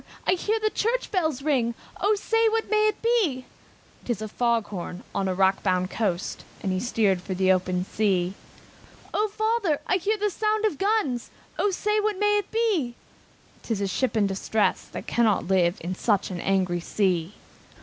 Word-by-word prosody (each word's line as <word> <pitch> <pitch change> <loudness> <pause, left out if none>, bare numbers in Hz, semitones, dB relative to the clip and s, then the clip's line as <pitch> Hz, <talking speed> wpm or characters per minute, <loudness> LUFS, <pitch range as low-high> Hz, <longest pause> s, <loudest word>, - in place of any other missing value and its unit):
I - - +3
hear 420 +5 +1
the 430 0 0
church 475 +3 -1
bells 315 -8 0
ring, 250 -6 +1 0.2
O 425 +1 +3
say, 450 +2 +2
what 445 -1 -1
may 430 0 +4
it 425 +1 -2
be?" 395 - +1 0.6
"Tis 240 -5 -2
a 215 - -4
fog 235 0 0
bell 180 -2 -5
on 195 - 0
a 185 - -1
rock 190 +1 +3
bound 185 -1 0
coast!" 195 -5 -2 0.2
And 190 - -1
he 185 - 0
steered 205 -4 +1
for 190 +1 -4
the 190 0 +3
open 185 -1 +1
sea. 190 -4 0 0.8
"O 425 +1 +2
father! 430 -6 0
I 370 - +2
hear 415 +4 0
the 415 0 0
sound 430 +2 0
of 385 -10 -1
guns, 390 - 0 0.3
O 410 - +3
say, 420 +3 0
what 420 -1 0
may 415 +1 +3
it 405 - -6
be?" 405 - 0 0.7
"Some 205 -4 -2
ship 225 +6 -1
in 210 - +4
distress, 200 +2 0
that - - -8
cannot 225 -4 +2
live 180 -1 +2
In 175 +3 -3
such 200 0 0
an 175 -2 -4
angry 185 -2 +1
sea!" 180 0 0
240 Hz, 180 wpm, -25 LUFS, -, 0.8 s, may